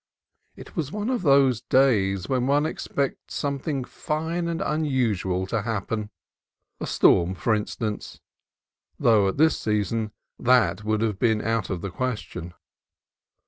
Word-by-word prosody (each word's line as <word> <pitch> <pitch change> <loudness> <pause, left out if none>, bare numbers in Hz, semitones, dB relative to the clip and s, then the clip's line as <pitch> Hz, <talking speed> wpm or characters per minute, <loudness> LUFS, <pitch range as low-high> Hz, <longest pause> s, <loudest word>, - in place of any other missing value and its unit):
It - - -12
was 150 -4 -2
one 210 +4 -2
of 250 - 0
those 135 -6 +4
days 100 -9 +2
when 130 -1 0
one 145 +2 +3
expects 140 -3 -3
something 140 -1 -2
fine 160 +6 -3
and 170 0 -2
un 155 +1 0
usual 105 -10 0
to 110 +3 -1
happen, 110 0 -3 0.3
— - - -56
a - - -3
storm, 90 +2 +4
for 110 +5 +1
instance, 105 0 -3 0.8
though 110 -4 +4
at 95 - -2
this 160 +1 +4
season 105 +1 -1 0.3
that 125 -4 +3
would 110 0 0 0.2
be 120 - +3
almost 105 -1 -3
out 115 -2 0
of 90 -3 -3
the 100 - -4
question. 105 -7 -4
115 Hz, 145 wpm, -25 LUFS, 105-140 Hz, 0.8 s, those